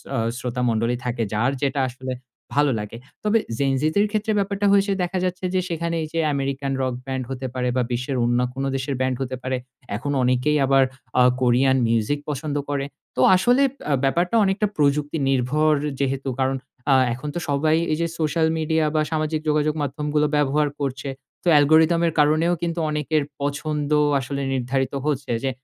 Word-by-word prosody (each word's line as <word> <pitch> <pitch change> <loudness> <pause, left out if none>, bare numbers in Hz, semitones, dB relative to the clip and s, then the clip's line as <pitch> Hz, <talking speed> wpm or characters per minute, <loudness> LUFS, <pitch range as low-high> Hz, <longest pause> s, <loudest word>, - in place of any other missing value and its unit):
অ - - 0 0.2
শ্রোতা 125 -1 -3
মন্ডলী 115 +2 +1
থাকে। 120 -1 -1
যার 120 +5 +1
যেটা 140 0 0
আসলে 130 +1 -6 0.4
ভালো 145 -1 +3
লাগে। 105 +2 -6 0.3
তবে 215 +2 +3 0.2
Gen 135 -1 +1
Z - - -3
দের 205 +1 +4
ক্ষেত্রে 215 +1 0
ব্যাপারটা 200 0 -1
হয়েছে 200 0 +3
দেখা 180 +2 -2
যাচ্ছে 185 0 -3
যে 185 - +2
সেখানে 170 0 -2
এইযে 160 +1 -3 0.2
আমেরিকান 135 0 -2
রক 130 -1 0
ব্যান্ড 130 -1 -3
হতে 130 0 -4
পারে 125 -1 -1
বা - - +3
বিশ্বের 125 +2 -2
অন্য 120 +1 +2
কোন 135 +1 -4
দেশের 135 +1 -2
ব্যান্ড 130 0 +1
হতে 130 0 -3
পারে। 130 0 -1 0.4
এখন 145 +5 -3
অনেকেই 130 +4 +2
আবার 135 0 +4 0.4
আ - - +7 0.2
কোরিয়ান 130 +2 +3
মিউজিক 115 +5 +1
পছন্দ 145 0 -3
করে। 140 -1 -1 0.3
তো 130 - 0
আসলে 245 +8 +3 0.3
আ - - +4
ব্যাপারটা 175 +9 +1
অনেকটা 195 +2 +1
প্রযুক্তি 145 +1 +1
নির্ভর 145 +4 +2 0.3
যেহেতু 135 0 -1
কারণ 135 0 +1 0.4
আ - - +7 0.2
এখন 130 +5 -7
তো - - -1
সবাই 155 +3 +2
এই 155 - +1
যে 170 - +1
সোশ্যাল 160 +1 +1
মিডিয়া 160 0 +1
বা 155 - +3
সামাজিক 155 0 0
যোগাযোগ 150 0 +2
মাধ্যমগুলো 150 +2 0
ব্যবহার 150 +1 +2
করছে। 135 0 -3 0.3
তো - - -5
অ্যালগোরিদমের 160 +3 +4
কারণেও 155 +4 +3
কিন্তু 170 0 -2
অনেকের 150 0 0 0.2
পছন্দ 145 +1 -2 0.3
আসলে 140 +2 -4
নির্ধারিত 130 +1 -1
হচ্ছে 145 -3 -1
যে 135 - +1
145 Hz, 175 wpm, -23 LUFS, 130-155 Hz, 0.4 s, আ